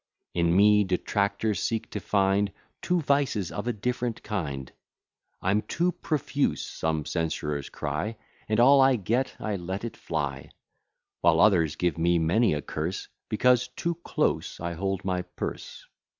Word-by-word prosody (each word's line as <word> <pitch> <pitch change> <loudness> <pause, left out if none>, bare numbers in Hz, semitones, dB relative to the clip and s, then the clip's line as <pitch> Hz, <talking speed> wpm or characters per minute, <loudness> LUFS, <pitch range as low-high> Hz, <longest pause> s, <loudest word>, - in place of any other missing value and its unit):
In 85 0 +2
me 105 +1 +6
detractors 100 +3 0
seek 115 -1 -2
to - - -3
find 100 0 +2 0.3
Two 180 -1 +1
vices 140 - +1
of 105 +3 -4
a - - +2
different 120 +2 -2
kind; 70 - -4 0.7
I'm 100 +3 +2
too 175 +9 0
profuse, 145 -4 -1
some 80 -2 -2
censurers 75 -2 -2
cry, 75 +10 -3 0.3
And 110 +1 +2
all 135 +3 +7
I 135 -1 +5
get, 120 +5 -1
I 105 -2 -2
let 95 +3 -4
it 115 - -5
fly; 75 -4 -3 0.7
While 85 -1 +4
others 85 -7 +4
give 85 -2 0
me 85 +1 +3
many 85 +4 +3
a 75 - -4
curse, 80 +5 -4 0.2
Because 125 +2 +3
too 170 +7 -2
close - - -1
I 85 0 -3
hold 95 +2 -2
my 90 -1 0
purse. 90 - -7
100 Hz, 150 wpm, -27 LUFS, 85-115 Hz, 0.7 s, all